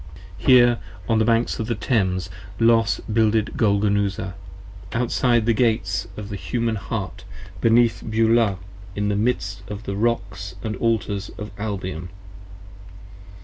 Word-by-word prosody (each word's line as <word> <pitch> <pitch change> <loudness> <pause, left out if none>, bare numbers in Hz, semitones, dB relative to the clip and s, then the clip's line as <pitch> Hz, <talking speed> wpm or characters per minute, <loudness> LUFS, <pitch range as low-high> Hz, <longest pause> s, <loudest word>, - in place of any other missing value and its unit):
15 - - -9
Here, 120 -2 +6 0.3
on 110 - +2
the 110 - +3
banks 115 +1 +1
of 110 - -2
the 120 - -1
Thames, 95 - 0 0.3
Los 115 -1 +4
builded 110 -1 +1
Golgonooza, 100 -2 +1 0.6
Outside 120 0 +2
of - - -5
the 115 - +3
Gates 105 -5 +1
of 105 -1 -6
the 100 - -4
Human 115 +2 -1
Heart 100 -2 -5 0.4
beneath 115 0 +4
Beulah 110 -2 +3 0.4
In 105 0 0
the 100 - +1
midst 100 -3 -1
of 105 +1 -6
the 100 -2 -4
rocks 100 -4 -2
of 110 - -2
the 95 - -8
Altars 105 -4 0
of 105 -1 -6
Albion. 95 -5 -4
105 Hz, 145 wpm, -23 LUFS, 100-115 Hz, 0.6 s, Here